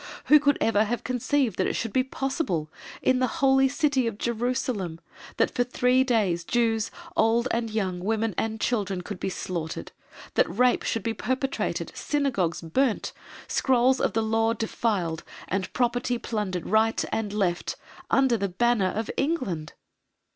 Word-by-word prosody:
Who 300 - +7
could 285 -1 +3
ever 220 -1 +3
have 240 +3 -2
conceived 255 -3 0
that 185 - +2
it - - -1
should 225 -3 -3
be 260 - +3
possible, 260 - -2 0.3
in 255 -1 +3
the 255 - +2
Holy 270 0 +4
City 285 -3 +1
of 220 -3 -3
Jerusalem, 235 -7 -2 0.4
that - - +2
for 245 - +2
three 250 +1 +2
days 205 -9 +1
Jews, 225 +2 +1 0.3
old 230 +2 +3
and 230 -1 -1
young, 195 -5 -2
women 220 +3 0
and 220 +3 -2
children 200 -6 -1
could 200 -1 -6
be - - -2
slaughtered; 175 -3 -4 0.4
that - - +3
rape 245 +8 +3
should 225 - -2
be 225 - -1
perpetrated, 260 +5 -2
Synagogues 240 - -1
burnt, 225 +8 0 0.3
scrolls 260 0 +3
of - - +1
the 225 0 +1
Law 225 +1 +2
defiled, 205 -7 -1 0.2
and 190 0 -2
property 245 0 0
plundered 205 -7 -3
right 220 +2 +2
and 220 -2 -1
left, 190 -4 -1 0.3
under 265 -3 +3
the 200 -1 -1
banner 215 0 +2
of 220 +3 -3
England! 205 - -1
225 Hz, 155 wpm, -26 LUFS, 195-255 Hz, 0.4 s, Who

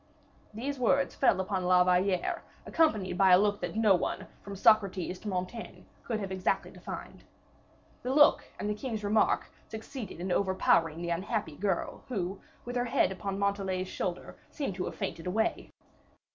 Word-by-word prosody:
These 260 +6 -4
words 275 +3 +2
fell 240 -8 +3
upon 190 -1 -1
La 180 0 +5
Valliere, 180 0 +1 0.2
accompanied 210 - +1
by 190 -2 +6
a - - +9
look 205 +1 +1
that - - -4
on 195 -4 +6
one, - - -3 0.2
from 200 -1 -8
Socrates 195 -3 +3
to - - -9
Montaigne, 185 +4 -4 0.2
could 225 -3 -2
have 195 -2 -5
exactly 185 -1 -1
defined. - - -8 0.8
The 255 - -2
look 295 +2 +6 0.2
and - - -2
the 210 - 0
king's 220 -1 -4
remark 210 +1 +2 0.2
succeeded 220 - -7
in 180 +1 -3
overpowering 175 -4 +2
the 170 - -2
unhappy 185 -1 -2
girl, 190 +1 -2
who, 195 -6 -3 0.2
with 245 +1 -3
her 245 - +1
head 230 -5 +2
upon 195 +1 -4
Montalais's 195 -2 -1
shoulder, 180 -2 -4
seemed 280 -10 -3
to 180 0 -3
have - - -5
fainted 165 - -4
away. 220 +5 -1
195 Hz, 165 wpm, -30 LUFS, 185-220 Hz, 0.8 s, a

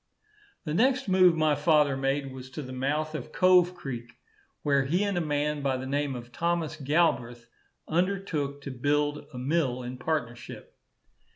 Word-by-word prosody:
The 150 - -2
next 255 +7 +2
move 185 -2 +5
my 155 -1 +3
father 150 -1 +3
made 135 0 -1
was 130 0 -9
to 150 - -6
the 130 0 -8
mouth 150 +4 -1
of 150 -6 -6
Cove 180 -1 +4
creek, 120 -6 -6 0.5
where 140 -2 +2
he 175 +8 +1
and 200 -2 -1
a 175 - +1
man 150 -1 -1
by 135 -2 0
the 130 - -5
name 140 0 -1
of 120 0 -9
Thomas 170 +3 -1
Galbreath 135 -6 0 0.4
undertook 165 -5 -1
to 140 - -5
build 145 +3 0
a 125 - -9
mill 130 -2 0
in 125 +1 -7
partnership. 125 -5 -4
145 Hz, 165 wpm, -28 LUFS, 130-165 Hz, 0.5 s, move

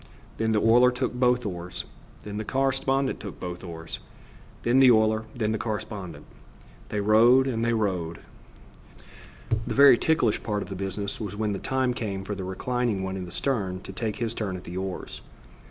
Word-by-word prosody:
Then 110 0 +1
the 110 - +2
oiler 120 +3 +6
took 125 0 -2
both 125 -1 +2
oars; 90 -2 -5 0.4
then 105 0 -6
the 110 - -2
correspondent 135 +2 0
took 100 - -8
both 90 0 -6
oars; 80 -2 -7 0.6
then 120 +3 +4
the 130 -1 +8
oiler; 110 -1 +3
then 110 -3 0
the 110 - -1
correspondent. 105 -4 -5 0.6
They 105 - -2
rowed 115 +5 +5
and 115 -4 -1
they 115 0 +2
rowed. 90 -7 -1 1.5
The - - -2
very 140 -3 +8
ticklish 160 -9 +2
part 105 -2 -2
of - - -11
the 95 - -5
business 100 +2 -4
was 105 -2 -4
when 105 -1 -1
the 95 - -3
time 130 -1 0
came 100 -5 -4
for 105 - -4
the 95 -1 -5
reclining 110 +2 -1
one 95 0 -3
in 95 -1 -4
the 85 - -10
stern 100 -7 -1
to - - -8
take 110 -3 -3
his 115 -1 -2
turn 100 -5 -3
at 90 - -11
the 85 - -8
oars. 95 0 -5
110 Hz, 185 wpm, -26 LUFS, 95-125 Hz, 1.5 s, the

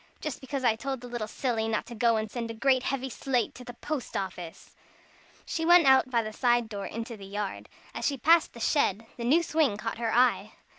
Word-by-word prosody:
Just 300 -4 -5
because 265 0 -4
I 230 -3 +3
told 265 +3 -4
the 250 - -8
little 240 -3 -4
silly 225 -1 -1
not 220 -1 -1
to - - -9
go 230 0 +2
and 215 -1 -3
send 235 -2 -4
a 230 - -6
great 260 +2 +3
heavy 265 0 -2
slate 255 -1 -1
to 250 - -11
the 245 -1 -10
post 250 -3 -4
office!" 180 -4 -7 0.7
She 325 - -3
went 345 -1 +6
out 265 -1 +5
by 235 -2 +1
the 215 0 -6
side 240 -1 +2
door 200 -2 -5
into 230 +1 -6
the 195 -2 -11
yard. 205 0 -5 0.2
As - - -2
she 280 - -1
passed 325 +6 +4
the 235 - -11
shed, 225 -5 +1
the 235 - -5
new 300 +8 +3
swing 310 -10 +1
caught 225 +1 -5
her 230 -1 -1
eye. 250 +2 +2
240 Hz, 230 wpm, -28 LUFS, 220-270 Hz, 0.7 s, went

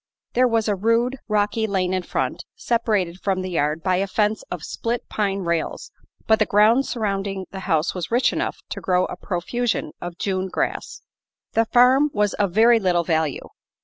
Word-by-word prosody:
There 250 +1 +4
was 225 -2 +1
a 210 - +2
rude, 230 +6 +1
rocky 210 +1 +1
lane 190 -2 0
in 185 - 0
front, - - -3
separated 215 - 0
from 190 -2 -1
the 185 - -5
yard 155 -1 0
by 185 -1 +2
a 195 +2 0
fence 210 +2 0
of 175 -3 -5
split 235 +1 -3
pine 200 -2 -1
rails, 170 -2 -2 0.3
but 220 0 +3
the 215 - +2
ground 220 +6 +4
surrounding 195 -4 -2
the 190 - -6
house 160 -1 +2
was 180 -3 -4
rich 245 +3 +2
enough - - -2
to - - -4
grow 180 -1 +2
a - - -6
profusion 200 0 -2
of 175 -1 -6
June 190 -1 -1
grass. - - -3 0.5
The 225 - +3
farm 255 +5 +5
was 205 -1 +1
of 200 -3 0
very 230 +4 +5
little 180 -4 +1
value. 160 -4 -1
200 Hz, 180 wpm, -22 LUFS, 180-225 Hz, 0.5 s, farm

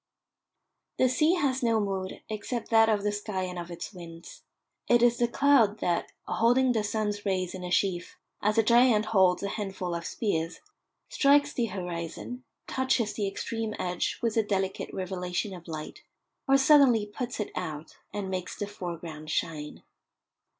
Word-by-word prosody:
The 255 - +4
sea 305 +7 +3
has 275 -6 0
no 230 -2 +2
mood 195 -2 -3
except 220 +2 -4
that 225 0 +6
of 210 -2 +1
the 210 - +1
sky 205 -2 -3
and 180 -1 -4
of 170 0 -7
its 170 +4 -7
winds. 170 -2 -11 0.5
It 240 0 +4
is 240 0 +4
the 240 - +3
cloud 240 -5 +4
that, 175 -4 -1
holding 245 +3 +3
the 220 -3 +1
sun's 210 -1 -2
rays 185 -3 -1
in 185 -1 -7
a 180 - -4
sheaf 180 -1 0 0.2
as 210 +2 +1
a 225 - +5
giant 235 -1 +5
holds 190 -2 +4
a - - 0
handful 195 -4 -4
of 170 0 -4
spears, 165 -7 -2 0.5
strikes 285 +1 +4
the 240 - 0
horizon, 180 +5 -5 0.2
touches 260 -4 0
the 205 -2 -1
extreme 220 +2 -3
edge 180 0 -2
with 230 -2 +1
a - - +6
delicate 195 -2 -2
revelation 185 +1 -3
of 175 -2 -11
light, 160 - -7 0.5
or 275 0 +6
suddenly 270 -6 +5
puts 240 +4 -5
it 210 - -3
out 155 -3 -5
and 205 -2 -4
makes 185 -1 -4
the 205 - -2
foreground 170 -6 -7
shine. 150 -1 -3
205 Hz, 165 wpm, -28 LUFS, 180-235 Hz, 0.5 s, that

